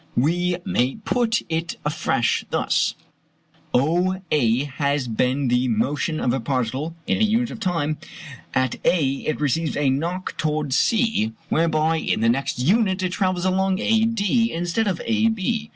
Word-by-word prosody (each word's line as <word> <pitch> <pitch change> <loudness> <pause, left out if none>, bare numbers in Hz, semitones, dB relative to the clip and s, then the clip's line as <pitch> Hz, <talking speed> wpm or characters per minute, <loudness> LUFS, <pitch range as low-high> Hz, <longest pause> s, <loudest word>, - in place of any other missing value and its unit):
We 175 +7 +1
may 135 -10 +1
put 230 +1 0
it 165 0 -2
afresh 150 -6 0
thus: - - +1 0.8
OA 155 -4 +1
has 140 -1 -1
been 125 +4 0
the 125 +1 +2
motion 140 +7 0
of 120 - +1
a 135 - 0
particle 130 +5 -2
in - - 0
a - - +3
unit 230 +3 +1
of 235 - -8
time; 165 -7 -1 0.6
at 130 -1 +1
A 165 -6 +3 0.2
it 155 - -1
receives 155 +3 0
a 145 -2 +2
knock 170 +7 -2
towards 150 -3 -1
C, 225 - +2 0.2
whereby 160 0 +2
in 160 - -1
the 115 - +3
next 135 +2 0
unit 190 - +2
it 185 - +1
travels 185 -2 0
along 190 0 +1
AD 225 0 +2
instead 205 -2 +1
of 185 -4 -1
AB. 225 0 0
165 Hz, 150 wpm, -22 LUFS, 135-190 Hz, 0.8 s, a